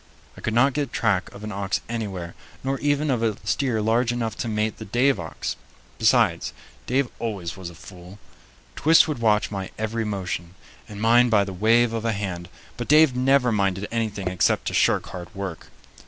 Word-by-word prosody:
I - - -12
could 110 - -2
not 130 +3 +4
get 140 -2 -2
track 100 -5 0
of 100 - -11
an 105 - -5
ox 100 -1 -1
anywhere, 100 -7 -4 0.3
nor 135 +1 -1
even 145 0 +1
of 120 -3 0
a 110 -3 0
steer 115 0 0
large 115 +2 +2
enough 115 -2 -2
to - - -3
mate 110 0 -1
the 110 - -8
Dave 120 +2 +2
ox. 80 -2 -4 0.4
Besides, 110 -7 +3 0.3
Dave 130 +1 +1
always 100 -7 -4
was 95 -3 -7
a 85 - -13
fool. 90 +2 -12 0.6
Twist 165 +2 +5
would 150 -6 -3
watch 105 -3 +2
my 95 -2 -4
every 110 +1 -2
motion, 90 -4 -4 0.3
and 105 -1 -8
mind 120 +2 +5
by 105 -3 +4
the 100 -1 -6
wave 115 +5 +3
of 115 - -2
the 115 0 0
hand, 95 -4 -4 0.3
but 120 - -4
Dave 150 -3 +6
never 130 -1 +3
minded 100 -1 0
anything 110 -4 -2
except 90 -1 +1
to - - -8
shirk - - +3
hard 90 -2 -9
work. 95 -4 -6
110 Hz, 190 wpm, -24 LUFS, 95-120 Hz, 0.6 s, Dave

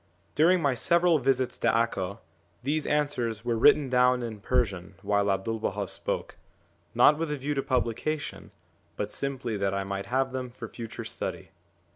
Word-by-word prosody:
During 170 +3 +4
my 140 -2 +3
several 170 +6 +3
visits 130 -1 0
to - - 0
Acca, 105 -4 +1 0.5
these 150 +3 -1
answers 120 -7 0
were 120 -1 +1
written 145 +5 +5
down 125 0 +3
in 110 -3 -5
Persian 100 -6 -1
while 100 0 +2
'Abdu'1 100 +3 -1
Baha - - -2
spoke, - - -4 0.6
not 150 +1 +6
with 165 -1 -1
a 150 - -2
view 140 +2 -2
to 135 - 0
publication, 135 +4 -2 0.5
but - - -3
simply 130 -5 -3
that 100 -1 0
I 100 - -1
might 100 0 -4
have 130 +3 0
them 130 -1 -4
for 125 - -8
future 115 -2 -7
study. - - -5
125 Hz, 165 wpm, -28 LUFS, 110-145 Hz, 0.6 s, not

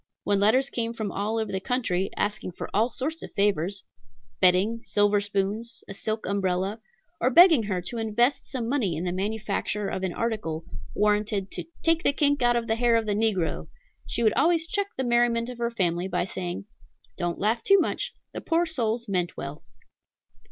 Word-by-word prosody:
When 200 -1 +2
letters 255 +7 +3
came 230 -1 -2
from 220 -4 -4
all 210 +3 -2
over 220 -1 -2
the 190 - -1
country, 195 -5 -1
asking 205 -3 -2
for - - -7
all 220 +4 +3
sorts 300 +7 -3
of - - -8
favors, 200 -1 0 0.6
bedding, 190 +6 +3
silver 205 -2 +2
spoons, 205 +3 -2
a - - -6
silk 215 +2 -3
umbrella, 195 +2 -1 0.4
or 250 - +3
begging 335 -1 +7
her 185 -3 -2
to 230 +6 -4
invest 230 +5 +1
some 245 -4 -3
money 230 - 0
in 165 - -3
the 180 - -1
manufacture 205 +1 -2
of - - -3
an 190 -1 -1
article, 175 -8 -3 0.3
warranted 210 -1 +1
"to - - -5 0.2
take 330 0 +3
the 285 - +3
kink 285 -1 +2
out 240 0 +4
of 235 -1 0
the 225 0 0
hair 240 -1 +3
of 225 -1 +2
the 210 - 0
negro," 205 -5 0 0.4
she 235 - -1
would 220 - +4
always 325 +4 +3
check 405 +4 -1
the 265 - 0
merriment 240 -1 +2
of 245 -1 -8
her 235 0 0
family 180 -5 0
by 180 - -1
saying, 180 0 -5 0.5
"Don't 175 -1 -2
laugh 220 +3 +1
too 395 0 +5
much; 485 +7 -1 0.2
the - - -5
poor 335 +1 +1
souls 235 -7 -1
meant 180 -3 -1
well." 140 +2 -6
215 Hz, 190 wpm, -26 LUFS, 195-240 Hz, 0.6 s, begging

